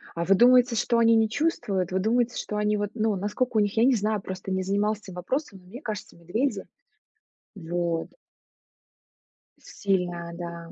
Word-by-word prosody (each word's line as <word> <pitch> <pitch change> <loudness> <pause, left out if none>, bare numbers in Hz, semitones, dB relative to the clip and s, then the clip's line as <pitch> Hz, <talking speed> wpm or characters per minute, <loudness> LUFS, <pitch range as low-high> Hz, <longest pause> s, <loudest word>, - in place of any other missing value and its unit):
А 170 0 -2
вы 195 - +5
думаете, 245 +2 +5
что 235 +1 +1
они 230 0 +5
не 225 0 +4
чувствуют? 210 - -1
Вы 190 - +1
думаете, 235 +4 +1
что 210 - -4
они, 210 0 +1
вот, 205 0 -2
ну, 220 -2 0
наскока 220 +5 -1
у - - +6
них, 205 -1 +1
я 225 - +5
не 260 +1 +5
знаю, 215 -1 0
просто 190 0 -6
не 190 0 0
занималась 205 +3 0
этим 190 -4 -11
вопросом, 200 - -3
но 180 - -21
мне 245 +9 -10
кажется, 215 -3 -6
медведи 215 +12 -2 0.9
Вот. 170 -2 -2 1.5
С - - -20
сильное, 175 -3 -1
да. 170 -1 -7
205 Hz, 180 wpm, -26 LUFS, 180-230 Hz, 1.5 s, у